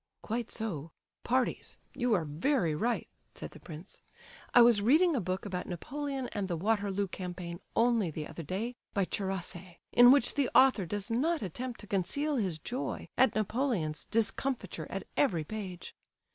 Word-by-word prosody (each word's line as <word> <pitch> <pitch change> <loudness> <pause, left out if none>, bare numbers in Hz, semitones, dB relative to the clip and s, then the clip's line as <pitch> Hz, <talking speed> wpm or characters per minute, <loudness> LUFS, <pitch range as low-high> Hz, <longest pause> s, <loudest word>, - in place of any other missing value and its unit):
"Quite 230 +1 -2
so—parties—you 225 - -2
are 165 -4 0
very 170 - +1
right," 230 +10 -1 0.3
said - - -7
the - - -12
prince. 165 +3 -11 0.5
"I 240 - +8
was 235 -3 +5
reading 310 - +4
a 245 - +1
book 185 +2 -3
about 185 -3 -4
Napoleon 270 - -4
and 200 -2 -2
the 175 -3 -2
Waterloo 200 +1 0
campaign 180 -2 -6 0.2
only 230 -5 +3
the 155 0 -5
other - - -7
day, 195 - -3 0.2
by 200 -2 +2
Charasse, 185 -2 -4
in 245 +1 +8
which 275 -3 +4
the 280 -3 +1
author 255 -9 +6
does 205 +4 -3
not 305 +5 +1
attempt 240 +7 -5
to - - -10
conceal 280 - 0
his 190 -8 0
joy 245 - -4
at 265 - +4
Napoleon's 215 - -1
discomfiture 235 +3 -1
at - - -4
every 175 - +2
page. 185 -1 -6
210 Hz, 155 wpm, -31 LUFS, 180-245 Hz, 0.5 s, I